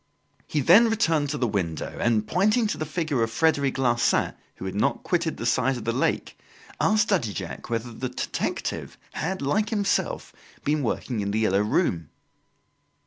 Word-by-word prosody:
He 150 - 0
then 205 - +7
returned 165 -10 +1
to 150 - -2
the 130 - +1
window 90 -7 -3
and, 110 -2 +2
pointing 210 +5 +2
to 210 - -1
the 155 - -3
figure 155 -5 -1
of 115 - +1
Frederic 140 +1 +1
Larsan, 120 -3 +2 0.2
who - - -8
had 95 - -3
not 105 +8 0
quitted 170 -3 0
the 115 - -5
side 130 +2 +2
of 120 - -7
the 115 - +1
lake, 125 +4 -1 0.4
asked 215 +2 +3
Daddy 170 - +1
Jacques 95 +2 -6
whether 115 0 -3
the 125 +3 -4
detective 125 - -3 0.2
had, 185 +2 -3
like 210 +10 +1
himself, 205 -3 -1 0.3
been 150 +1 +1
working 120 -1 -2
in 100 -1 -1
"The 105 - -1
Yellow 100 -2 +3
Room"? 85 -6 0
135 Hz, 175 wpm, -25 LUFS, 115-170 Hz, 0.4 s, then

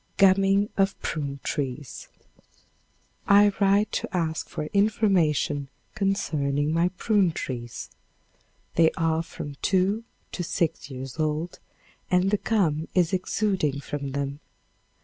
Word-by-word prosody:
Gumming 195 +1 +4
of 195 0 +1
Prune 140 -3 -3
Trees. 135 -2 -4 1.2
I 205 +1 +6
write 200 +1 +3
to 185 - -2
ask 160 -2 -2
for - - -4
information 180 -9 +2 0.2
concerning 155 -8 0
my 170 +2 +3
prune 205 -6 +2
trees. 120 -6 -6 0.9
They 165 -1 +6
are 165 0 +1
from 145 -3 -8
two 195 +3 +2 0.3
to 175 - -3
six 165 -3 -1
years 130 +2 -7
old 155 +3 -1 0.5
and 180 +2 +3
the 210 - +3
gum 165 -9 0
is 180 -1 +3
exuding 185 -6 0
from 140 -2 -5
them. 140 0 -3
165 Hz, 115 wpm, -26 LUFS, 145-195 Hz, 1.2 s, I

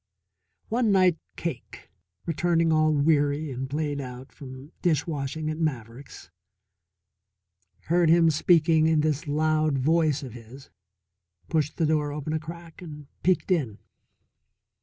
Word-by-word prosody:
One 230 -1 +1
night 185 -4 +3 0.2
Cake, 160 -8 -7 0.3
returning 165 0 +1
all 155 0 +3
weary 145 0 +1
and 130 +1 -5
played 145 0 -2
out 125 0 -9
from 135 +1 -11
dish 160 -4 +1
washing 155 0 -4
at 155 - -6
Maverick's, 125 - -5 1.5
heard 170 0 +2
him 165 0 +5
speaking 160 0 +3
in 160 -1 +3
this 155 +1 -1
loud 155 0 +1
voice 155 +1 +1
of 125 -4 -8
his, 120 +3 -13 0.8
pushed 155 -2 -1
the 165 - +1
door 150 -1 0
open 150 +1 -4
a 160 - 0
crack, 165 +1 -11
and 150 -4 -9 0.2
peeked 185 +2 +1
in. 130 - 0
155 Hz, 130 wpm, -26 LUFS, 140-165 Hz, 1.5 s, him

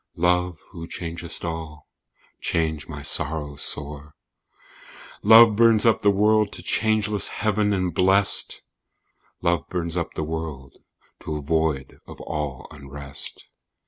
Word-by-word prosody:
"Love, 90 0 +1
who 85 -3 -8
changest 85 0 -5
all, 80 -3 -6 0.5
change 80 -2 -1
my 75 -3 -8
sorrow 75 0 0
sore!" 75 +1 -4 1.1
Love 110 0 +8
burns 115 -1 +4
up 115 - +3
the 105 - +4
world 105 +1 +3
to 85 - -7
changeless 105 +1 +1
heaven 105 0 0
and 90 -3 -1
blest, 95 +3 +3 0.8
"Love 85 -3 0
burns 85 -2 -3
up 85 -2 -3
the 80 - -2
world 75 -4 -6 0.4
to 75 - -5
a - - -3
void 80 -3 -1
of - - -11
all 75 -4 -5
unrest." 70 -1 -8
85 Hz, 125 wpm, -23 LUFS, 75-100 Hz, 1.1 s, Love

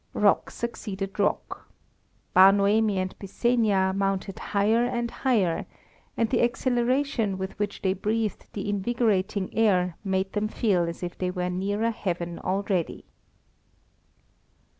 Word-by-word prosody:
Rock - - +3
succeeded 200 -4 -5
rock. 205 - -1 0.6
Bar 190 +1 +8
Noemi 205 +1 +2
and 185 0 -2
Byssenia 200 -2 +1
mounted 195 -1 -1
higher 215 +4 +2
and 240 -1 -1
higher, 210 -11 0 0.5
and 230 - +2
the 240 - +1
exhilaration 245 -2 +1
with 190 0 -4
which 205 -1 -3
they 190 -1 +2
breathed 215 +2 -2
the 200 0 -4
invigorating 205 -2 0
air 185 -6 +2
made 190 -1 -1
them 210 0 0
feel 190 -6 +1
as 170 - -7
if 175 - -4
they 185 - 0
were 180 0 -2
nearer 205 +5 0
heaven 175 -5 -3
already. 190 -3 -2
200 Hz, 125 wpm, -26 LUFS, 190-225 Hz, 0.6 s, Bar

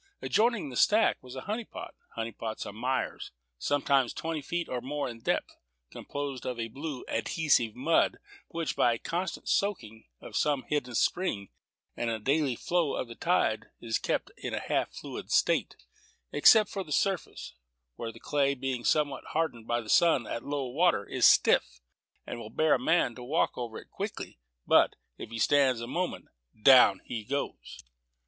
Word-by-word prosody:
Adjoining 225 - +1
the 125 - -8
stack 215 - +3
was 125 0 -11
a 130 - -5
honey 215 - -3
pot. - - -9 0.2
Honey 115 0 -3
pots 110 -1 -5
are - - -7
mires, 125 +4 -2 0.3
sometimes 135 - +2
twenty 160 -2 -3
feet 170 +4 -3
or 125 -1 -3
more 145 +3 -3
in 120 -2 -8
depth, - - -1 0.4
composed 140 -3 -5
of 125 -2 -4
a 115 0 -3
blue, 140 +2 -6
adhesive 120 -1 +1
mud, - - +2 0.3
which, 165 -1 -3
by 120 - +3
the - - -3
constant 175 +8 -4
soaking 110 - -1
of - - -10
some 145 -3 +1
hidden 125 -5 -2
spring, 110 - 0 0.5
and 120 - -2
the 115 - -1
daily 135 +3 +1
flow 170 +2 0
of - - -3
the 115 - -8
tide, 115 -7 +1
is 115 -2 -1
kept - - -2
in - - -4
a - - -1
half - - -1
fluid - - -8
state, - - +2 0.6
except 215 +8 +6
upon 195 -4 -4
the - - -10
surface, 195 +4 -1 0.4
where 115 -1 -5
the 115 - -14
clay, 140 +1 +1
being 130 -2 -3
somewhat 145 -1 +1
hardened 140 -9 -1
by 120 0 0
the 110 - -13
sun 145 -1 +4
at 115 - -5
low 140 -1 -2
water, 140 - +2
is - - +4
stiff, - - +4 0.5
and 120 - -6
will 110 -2 -8
bear 155 +4 +2
a - - +3
man 165 -7 +2
to 125 - -10
walk 145 +7 0
over 120 -2 -5
it - - -12
quickly; - - -6 0.3
but, - - +4 0.2
if - - -7
he 115 - -6
stands 130 0 +3
a 115 - -4
moment, 175 +9 -3 0.3
down 125 -5 +7
he 110 -2 -5
goes. 140 +6 -5
135 Hz, 180 wpm, -29 LUFS, 115-160 Hz, 0.6 s, down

